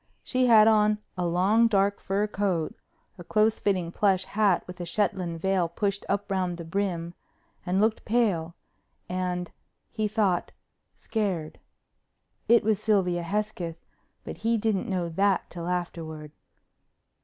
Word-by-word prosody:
She 255 -1 +1
had 220 -2 +7
on 215 -1 +4 0.2
a 180 -1 -1
long 195 +7 +3
dark 200 -2 +2
fur 200 +2 0
coat, 195 -6 -1 0.5
a - - -7
close 215 +4 +2
fitting 185 -4 0
plush 190 -1 +2
hat 205 -3 +2
with 180 0 -9
a - - -2
Shetland 175 -2 -1
veil 185 -1 +1
pushed 200 +3 -2
up 200 0 -1
round 185 -2 -1
the 170 - -6
brim, 175 -1 -2 0.5
and 185 +2 +1
looked 215 +1 +1
pale, 195 -8 0 0.5
and, 180 -1 -3 0.4
he 215 -2 -1
thought, 205 -4 0 0.4
scared. 190 -8 -3 0.9
It 235 0 +5
was 215 -1 +1
Sylvia 185 -5 +2
Hesketh, 175 -3 -3 0.4
but - - -7
he 230 +1 +1
didn't 215 -3 -1
know 180 -3 -1
that 195 +3 +1
till 170 -1 -6
afterward. 165 -4 -4
195 Hz, 140 wpm, -27 LUFS, 175-210 Hz, 0.9 s, had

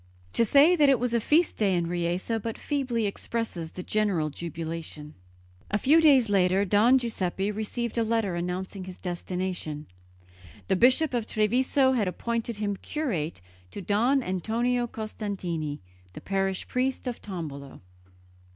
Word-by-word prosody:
To - - +3
say 285 - +6
that 295 -4 +5
it 265 -4 +4
was 245 0 -1
a 235 - +3
feast 310 +9 +2
day 200 -4 +2
in 170 -1 0
Riese 175 +4 -2
but 225 +1 -4
feebly 255 -6 -1
expresses 200 -4 -3
the 180 - -6
general 190 -9 0
jubilation. 160 -2 -6 0.6
A 205 - +1
few 300 +9 +5
days 275 -7 +6
later 195 0 +3
Don 215 +7 +5
Giuseppe 200 -5 -1
received 230 +3 -3
a - - +3
letter 225 -4 0
announcing 180 +2 -4
his 185 -1 -9
destination. 180 -4 -4 0.8
The 190 - +3
Bishop 260 +8 +4
of 235 -2 -1
Treviso 255 +5 +2
had 230 -7 +1
appointed 230 +4 -3
him 205 -1 -2
curate 185 - -3 0.3
to - - -8
Don 235 +8 +2
Antonio 235 +6 0
Costantini, 190 -9 -4 0.3
the - - -9
parish 195 -1 -1
priest 260 +2 -1
of 245 -2 -4
Tombolo. 150 -8 -7
205 Hz, 145 wpm, -27 LUFS, 180-240 Hz, 0.8 s, say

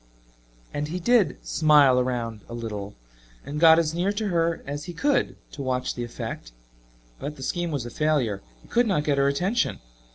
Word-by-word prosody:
And 145 +1 -2
he 175 +4 -4
did 230 +2 +3
"smile 145 -5 +5
around 120 -3 -2
a 120 - -6
little," 105 -3 -5 0.5
and 145 +2 -4
got 160 0 +8
as 160 -2 +1
near 180 +4 +1
to 210 0 -2
her 170 -2 0
as 145 +1 -5
he 175 - -6
could 280 - +1 0.2
to 145 - -7
watch 130 -1 -1
the 120 - -4
effect, 85 - -6 0.7
but 145 +2 -5
the 135 - -9
scheme 175 +4 -1
was 140 -6 -3
a 120 - -7
failure 145 -10 0 0.2
he - - -18
could 240 0 +2
not 185 -8 +1
get 145 -2 +1
her 140 - +4
attention. 180 +12 0
150 Hz, 190 wpm, -25 LUFS, 125-170 Hz, 0.7 s, got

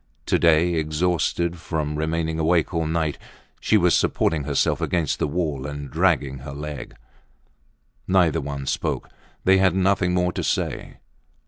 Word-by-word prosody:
To - - +1
day, 85 +1 +4
exhausted 85 +2 0
from 75 -3 -3
remaining 80 +1 -1
awake 85 +2 +2
all 80 -1 0
night, 80 -2 -1 0.4
she 110 - +3
was 90 -3 +3
supporting 75 -4 +1
herself - - +1
against 85 -5 0
the - - +1
wall 75 -4 -2
and 70 -2 -7
dragging 80 -5 +1
her 70 +1 -8
leg. 75 -1 -7 1.1
Neither 90 -7 +3
one 70 -1 -5
spoke, - - -2 0.3
they 95 0 +5
had 95 -2 +3
nothing 95 -1 +2
more 90 0 +1
to - - -3
say. - - -2
80 Hz, 145 wpm, -23 LUFS, 75-90 Hz, 1.1 s, they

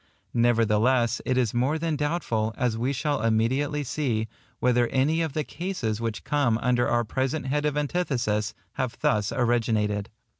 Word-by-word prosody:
Nevertheless 120 +1 +2
it 130 - +1
is 120 -5 +1
more 130 +6 +1
than 160 -1 -1
doubtful, 145 -8 -1
as 125 -4 0
we 120 +4 -1
shall 145 -1 -1
immediately 130 +7 +1
see, 125 -5 -1 0.3
whether 125 -1 +3
any 150 +7 +1
of 160 -4 -2
the 155 - -1
cases 135 - -3
which 115 -2 -3
come 140 -6 +1
under 120 0 +1
our 120 0 +2
present 130 +5 -2
head 145 +2 0
of 150 0 -1
antithesis, 135 -9 -1 0.2
have 130 -2 -3
thus 105 0 +1
originated. 110 -4 0
125 Hz, 155 wpm, -26 LUFS, 115-145 Hz, 0.3 s, whether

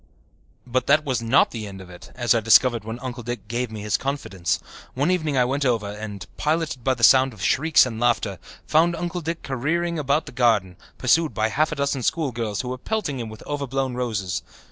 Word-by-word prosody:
But 130 +1 -1
that 150 +2 +4
was 130 -4 -1
not 115 +4 +3
the 110 -3 -5
end 95 -1 -9
of 90 -1 -11
it, 90 - -13
as 120 -1 +2
I 115 - +2
discovered 115 +1 +4
when 110 +2 -5
Uncle 125 -2 -5
Dick 120 -1 -6
gave 120 +2 -2
me 110 -1 -7
his 105 -1 0
confidence. 125 -10 -2 0.4
One 145 +7 +1
evening 155 -6 0
I 125 - +4
went 140 +3 -1
over 115 -6 +1
and, 105 -3 -7
piloted 155 -4 -1
by 130 +1 +2
the 120 - -7
sound 130 +2 +6
of 95 -4 -9
shrieks 155 - +4
and 115 -3 -5
laughter, 115 -6 +1 0.3
found 170 +2 +3
Uncle 175 +1 -3
Dick 165 +1 -4
careering 165 +6 -1
about 145 +2 +1
the - - -9
garden, 110 -7 +2 0.2
pursued 155 +5 +2
by 110 0 +1
half 155 +8 +1
a - - -2
dozen 140 -1 -1
schoolgirls 120 -9 -1
who 125 - -6
were 130 0 -4
pelting 185 - -2
him 115 -2 -5
with 110 - -11
overblown 135 -2 -2
roses. 110 -8 -2
125 Hz, 210 wpm, -23 LUFS, 110-145 Hz, 0.4 s, sound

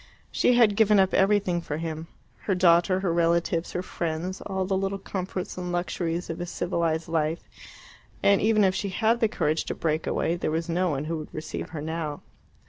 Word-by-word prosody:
She 250 - +3
had 225 -4 +5
given 210 -1 +5
up 190 -1 +3
everything 190 -3 +2
for 150 -3 -4
him 160 0 -5 0.4
her 195 - +1
daughter, 180 +1 +4
her 180 -4 0
relatives, 170 0 +1
her 180 - -2
friends, 170 +2 -3
all 190 -1 -2
the 190 +1 0
little 195 +1 -1
comforts 185 -1 -5
and 180 -1 -4
luxuries 175 -1 -2
of 165 +1 -5
a 175 - -4
civilized 170 -2 -1
life 160 0 -1 0.8
and 200 -1 +5
even 215 0 +4
if 190 -1 +3
she 200 +1 -2
had 225 +5 +1
the 225 - +3
courage 155 -6 0
to - - -3
break 155 -1 -1
away, 170 - 0
there - - -2
was 165 +2 -1
no 180 +2 +1
one 145 -1 -2
who 165 0 -2
would 155 - -9
receive 155 - -5
her 155 -3 -6
now. 160 -2 -4
175 Hz, 200 wpm, -26 LUFS, 165-190 Hz, 0.8 s, had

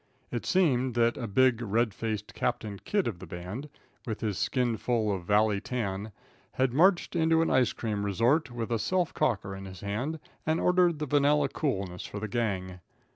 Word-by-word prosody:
It 120 - -3
seemed 130 -9 +2
that 120 0 +3
a 115 - -4
big, 125 +3 +3
red 115 0 +1
faced 110 -1 -4
Captain 110 -5 -2
Kidd 205 -2 0
of 95 -7 -4
the 95 - -9
band, 90 - -6 0.4
with 110 -2 -3
his 105 -4 -1
skin 125 -3 0
full 110 -4 0
of 90 -3 -5
valley 105 0 +3
tan, 105 -3 -3 0.4
had 130 -2 +1
marched 175 +6 +3
into 165 0 +3
an - - 0
ice 130 -6 +4
cream 105 -3 -3
resort 120 - +2
with 120 -1 -4
a 115 - +1
self 180 +9 0
cocker 100 -4 0
in 95 0 -8
his 95 -2 -10
hand, 125 +11 -3 0.2
and 160 +1 +1
ordered 180 -2 +3
the 150 - -2
vanilla 145 0 +3
coolness 95 - -2
for 100 - -6
the 110 - -3
gang. 95 -5 -2
115 Hz, 185 wpm, -29 LUFS, 100-140 Hz, 0.4 s, ice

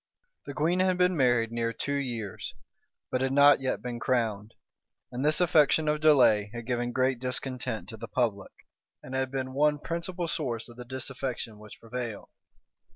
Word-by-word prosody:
The 140 - -6
queen 165 +6 +1
had 185 -1 +2
been 180 0 +3
married 120 -5 +2
near 115 0 -1
two 145 +4 -3
years, 120 -8 -4 0.6
but 125 - 0
had 130 0 +1
not 145 0 +7
yet 130 -4 -2
been 120 -1 -4
crowned; 110 -4 -1 0.6
and 125 +2 -3
this 150 +2 +3
affectation 160 -3 +4
of 150 0 +1
delay 125 -9 +5
had 120 -1 -6
given 120 0 -1
great 130 0 +1
discontent 125 -2 -3
to 110 - -8
the - - -7
public, 110 -6 -1 0.5
and 130 - -9
had 130 0 0
been 130 -1 -4
one 150 +2 +3
principal 170 +3 -3
source 125 -9 -2
of 120 - -13
the 125 - -8
disaffection 130 -3 -4
which 105 -1 -13
prevailed. 115 -2 -6
130 Hz, 170 wpm, -28 LUFS, 120-145 Hz, 0.6 s, not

